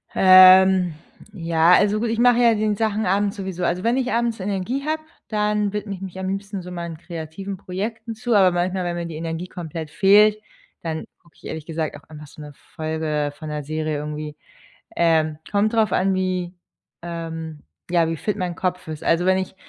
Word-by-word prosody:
Ähm, 185 -1 +7 0.4
ja, 165 -2 +3
also 210 +2 +4
gut, 230 0 -1
ich 230 - -1
mache 245 0 +5
ja 235 -1 +5
die 210 0 0
Sachen 220 0 -1
abends 200 +3 +1
sowieso. 190 -2 -5
Also 175 +2 0
wenn 235 +3 +2
ich 255 -1 -1
abends 235 -1 0
Energie 205 +8 -3
habe, 310 0 -1 0.3
dann 210 -1 0
widme 210 0 -4
ich 190 - -9
mich 190 -1 -7
am 190 - -3
liebsten 195 0 -4
so 180 - -9
meinen 170 -2 -6
kreativen 170 +3 -7
Projekten 220 +5 -5
zu, 235 +2 -2
aber 190 -2 +5
manchmal, 180 +1 -1
wenn 175 -1 -2
mir 170 0 -4
die 165 -2 -7
Energie 165 +2 -4
komplett 165 -3 -7
fehlt, 210 +4 +5 0.4
dann 160 -1 -4 0.2
gucke 170 - -26
ich - - -18
ehrlich 160 -2 -6
gesagt 160 -1 -3
auch - - -12
einfach 150 -1 -11
so 150 - -13
'ne 150 0 -9 0.2
Folge 155 -2 -2
von 155 -2 -7
'ner 150 -1 -4
Serie 155 0 -2
irgendwie. 150 0 -5 0.6
Ähm, 160 -2 +2
kommt 210 +2 +1
drauf 220 -4 +2
an, 190 +1 +2
wie 185 -1 -2 0.5
ähm, 165 -2 -6 0.3
ja, 170 -2 +3
wie 165 - -3
fit 210 +6 -2
mein 180 -2 -3
Kopf 180 -1 -3
ist. 155 -1 -7
Also 170 +2 +2
wenn 185 0 +4
ich 190 0 -4
185 Hz, 200 wpm, -22 LUFS, 165-205 Hz, 0.6 s, Ähm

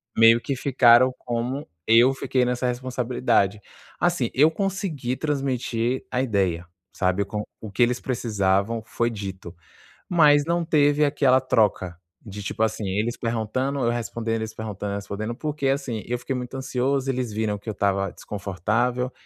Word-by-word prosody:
meio 115 +1 +7
que 135 +3 -3
ficaram 130 -1 +5
como 125 +4 -3 0.2
eu 120 +4 +6
fiquei 130 -1 0
nessa 125 +1 -1
responsabilidade. 125 -4 0 0.4
Assim, 170 -9 +1
eu 150 +4 +5
consegui 175 - -2
transmitir 130 -4 -1
a 125 - 0
ideia, 95 -8 0 0.3
sabe, 95 +1 0
com 105 +1 -4 0.2
o 110 - -8
que 100 +5 +2
eles 125 +1 +1
precisavam, 110 -3 0
foi 115 +1 -1
dito. 95 -5 -7 0.6
Mas 150 -4 +5
não 170 +2 0
teve 150 -2 +3
aquela 135 -2 +3
troca 105 -8 +1 0.3
de, 105 -2 -8
tipo 100 - -3
assim, 110 -1 -2
eles 105 +5 -1
perguntando, 120 +4 -2
eu 120 -2 +2
respondendo, 115 -1 -3
eles 110 0 -4
perguntando, 105 -2 -5
eu - - -2
respondendo, 100 +3 -4
porque, 150 -1 -2
assim, 135 -5 -1
eu 125 0 -2
fiquei 125 +2 -4
muito 125 0 -5
ansioso, 135 +1 -1
eles 125 -4 -2
viram 105 -1 -1
que 105 - -14
eu - - -1
estava 100 0 0
desconfortável, 110 +6 -2
120 Hz, 155 wpm, -24 LUFS, 105-130 Hz, 0.6 s, meio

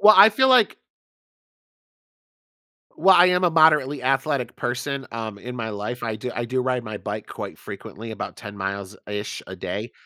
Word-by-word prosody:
Well, 215 +1 +8
I 200 +3 +10
feel 260 +5 +3
like 250 -4 +5 2.2
Well, 190 -1 +6
I 175 +1 +7
am 180 0 +2
a 175 - +5
moderately 150 -4 +4
athletic 135 -1 0
person, 130 +2 -3
um, 110 -3 -5
in 125 +4 -8
my 115 -2 -4
life, 105 +4 -5
I 110 -2 -2
do 125 +3 -5
I 120 - -3
do 130 +1 -1
ride 125 -1 -1
my 110 -2 -6
bike - - -6
quite - - -7
frequently, 115 +2 -9
about 110 - -6
10 100 -2 -9
miles 100 +1 -4
ish 105 0 -4
a - - -7
day. - - -5
125 Hz, 180 wpm, -23 LUFS, 110-155 Hz, 2.2 s, I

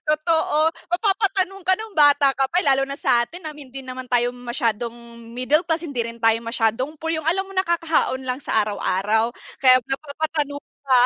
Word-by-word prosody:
Totoo 315 0 +2 0.2
mapapatanong 390 0 0
ka 375 - +5
nung 440 +1 -8
bata 290 -2 +5
ka 270 0 0
pa 350 +5 +1
lalo 270 -2 +3
na 275 - -5
sa'tin 245 +10 0
na 310 - -5
hindi 270 -3 -10
naman 255 0 -7
tayo 245 0 +2
masyadong 240 -2 -2 0.4
middle 255 +5 +3
class, 330 0 0
hindi 280 -6 -3
rin 230 0 -5
tayo 225 0 +4
masyadong 235 +5 -1
poor, 325 +2 -3
yung 315 -1 -2
alam 385 +3 +1
mong 390 -1 -1
nakakaahon 330 -6 0
lang 255 +2 -2
sa 220 -5 +1
araw-araw, 210 +2 0 0.3
kaya 255 -2 +7
napapatanong 290 +1 -3 0.2
ka. 260 -3 +4
280 Hz, 175 wpm, -22 LUFS, 245-320 Hz, 0.4 s, kaya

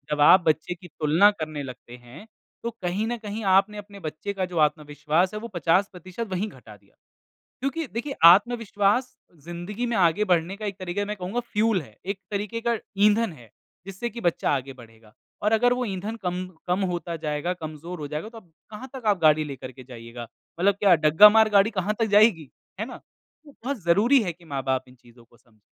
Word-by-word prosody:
जब 145 - -2
आप 185 +5 +8
बच्चे 155 +3 +1
की 180 0 -14
तुलना 160 +6 +4
करने 155 -6 -5
लगते 125 -2 -10
हैं, 125 - -14 0.4
तो 235 - -1
कहीं 195 +5 -1
न 240 0 -2
कहीं 215 0 -6
आपने 210 +2 +2
अपने 205 -1 -10
बच्चे 160 +5 -5
का 190 -1 -2
जो 175 -2 -7
आत्मविश्वास 150 +4 +1
है 210 - -4
वो 235 - -7
50% 185 +5 -1
वहीं 190 +4 -1
घटा 120 - -14
दिया, 100 0 -31 0.7
क्योंकि 275 +4 -2
देखिए 275 +4 -3
आत्मविश्वास 210 +4 +4 0.3
ज़िंदगी 175 +8 -5
में 235 - -1
आगे 180 +3 +3
बढ़ने 180 0 +1
का 215 0 -6
एक 195 -2 -4
तरीक़ा 185 +2 -3
है - - -3
मैं 210 - -3
कहूँगा 190 +6 -3
फ्यूल 220 -4 0
है, 110 -6 -17
एक 195 0 -3
तरीक़े 210 +3 -3
का 235 - +2 0.3
ईंधन 215 -2 +2
है, 120 -7 -16 0.4
जिससे 195 +5 -4
कि 235 - -8
बच्चा 175 -5 0
आगे 135 -1 -2
बढ़ेगा 115 -3 -17 0.3
और 210 +1 +1
अगर 245 +2 +4
वो 250 0 -2
ईंधन 205 +3 -4
कम 180 +1 -2 0.2
कम 180 +3 +1
होता 170 -1 -4
जाएगा, 155 +2 -2
कमज़ोर 160 +1 -8
हो 145 - -5
जाएगा 150 +7 -5
तो 225 0 -12
कहाँ 210 +8 -13
तक 250 -4 -8
आप 200 -4 +2
गाड़ी 155 0 +5
लेकर 130 -2 -8
के 130 0 -13
जाइएगा। 120 -1 -9 0.3
मतलब 200 +1 +4
क्या 195 -4 +6
डग्गा 155 +7 +7
मार 220 0 +5
गाड़ी 200 +2 +4
कहाँ 205 +1 -1
तक 225 - +3
जाएगी, 190 - +4 0.3
है 220 - -2
ना? 255 - -8 0.5
तो 290 - -15
बहुत 255 -6 -3
ज़रूरी 225 +10 +4
है 175 -4 -2
कि 170 +1 -21
माँ-बाप 135 -3 -2
इन 125 - -17
चीज़ों 120 -1 -20
को 120 - -25
समझें। 110 -3 -30
180 Hz, 205 wpm, -25 LUFS, 150-210 Hz, 0.7 s, आप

